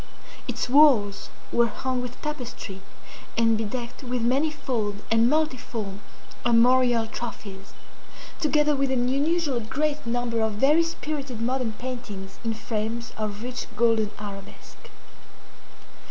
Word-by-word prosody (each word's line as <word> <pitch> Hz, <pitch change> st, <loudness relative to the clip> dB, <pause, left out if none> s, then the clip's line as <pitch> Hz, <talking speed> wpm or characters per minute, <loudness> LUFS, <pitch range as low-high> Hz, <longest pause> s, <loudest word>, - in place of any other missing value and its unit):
Its -, -, -2 dB
walls 245 Hz, -8 st, +5 dB, 0.2 s
were 235 Hz, 0 st, +4 dB
hung 255 Hz, +2 st, -2 dB
with 250 Hz, 0 st, -7 dB
tapestry 250 Hz, -9 st, -5 dB, 0.6 s
and 225 Hz, -1 st, +4 dB
bedecked 235 Hz, +4 st, -4 dB
with 250 Hz, -2 st, -2 dB
manifold 250 Hz, -6 st, 0 dB
and 225 Hz, +1 st, +5 dB
multiform 245 Hz, -9 st, -1 dB, 0.4 s
armorial 240 Hz, 0 st, +5 dB
trophies, 205 Hz, -4 st, -7 dB, 0.6 s
together 300 Hz, -1 st, +3 dB
with 275 Hz, 0 st, +1 dB
an 250 Hz, -2 st, +1 dB
unusually 285 Hz, -2 st, +1 dB
great 290 Hz, +6 st, -1 dB
number 235 Hz, -1 st, 0 dB
of 220 Hz, -1 st, +1 dB
very 275 Hz, +9 st, +4 dB
spirited 295 Hz, -6 st, -3 dB
modern 245 Hz, -1 st, 0 dB
paintings 215 Hz, -6 st, -7 dB
in 225 Hz, -1 st, -1 dB
frames 220 Hz, +2 st, -3 dB
of 215 Hz, 0 st, -4 dB
rich 250 Hz, 0 st, -4 dB
golden 225 Hz, -2 st, +3 dB
arabesque. 200 Hz, -1 st, -10 dB
240 Hz, 115 wpm, -26 LUFS, 220-265 Hz, 0.6 s, walls